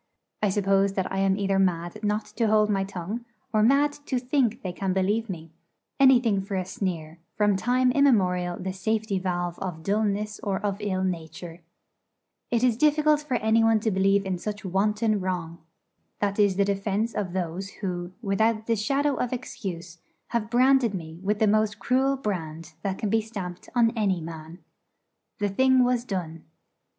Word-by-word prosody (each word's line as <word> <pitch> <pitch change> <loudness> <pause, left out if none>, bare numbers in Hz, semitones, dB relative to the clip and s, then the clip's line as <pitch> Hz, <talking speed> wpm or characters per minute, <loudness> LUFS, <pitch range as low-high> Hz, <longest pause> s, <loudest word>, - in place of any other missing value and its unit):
I 210 - +2
suppose 195 0 +2
that 190 -2 -2
I 190 - -1
am 195 0 +2
either 195 -1 +1
mad 175 +1 0
not 210 +1 0
to 230 - +2
hold 215 0 +3
my 195 -1 +1
tongue, 195 +4 -5 0.3
or 215 - +3
mad 280 +6 +4
to 260 - 0
think 250 -2 0
they 185 - -3
can 190 0 -2
believe 205 +4 0
me 165 -3 -7 0.5
anything 245 -7 +5
for 195 +1 -5
a 185 -1 -1
sneer, 170 -4 -4 0.2
from 205 -1 +3
time 250 +6 +2
immemorial 185 -10 +2
the 185 0 -4
safety 210 +1 -1
valve 175 -2 -2
of 180 -4 -5
dulness 210 +1 -1
or 195 -2 -2
of 200 -1 -1
ill 190 -3 -1
nature. 170 -1 -5 0.9
It 235 0 +1
is 245 -3 +3
difficult 300 +1 +3
for 295 -4 -2
anyone 225 0 +3
to 220 - 0
believe 195 +1 +2
in 185 -2 -2
such 205 +1 -5
wanton 210 +3 +1
wrong. 175 -3 -3 0.6
That 200 0 -1
is 200 -2 +4
the 200 +1 +2
defence 200 +3 -1
of 185 -4 -3
those 185 +1 -3
who, 175 -2 -3
without 220 +2 +1
the 230 - +1
shadow 275 +6 0
of 250 - -1
excuse, 175 -9 -6 0.3
have 230 -2 -1
branded 250 -2 +4
me 165 -2 -7
with 205 +2 0
the 220 - +3
most 215 0 +2
cruel 265 +4 +1
brand 165 - -4
that 195 -1 -2
can 210 - -2
be 225 0 +3
stamped 195 -5 -7
on 230 -2 +4
any 205 -6 0
man. 160 +1 -9 0.7
The 205 -3 0
thing 260 +5 +4
was 245 -1 +1
done. 170 -7 -5
200 Hz, 175 wpm, -26 LUFS, 185-225 Hz, 0.9 s, anything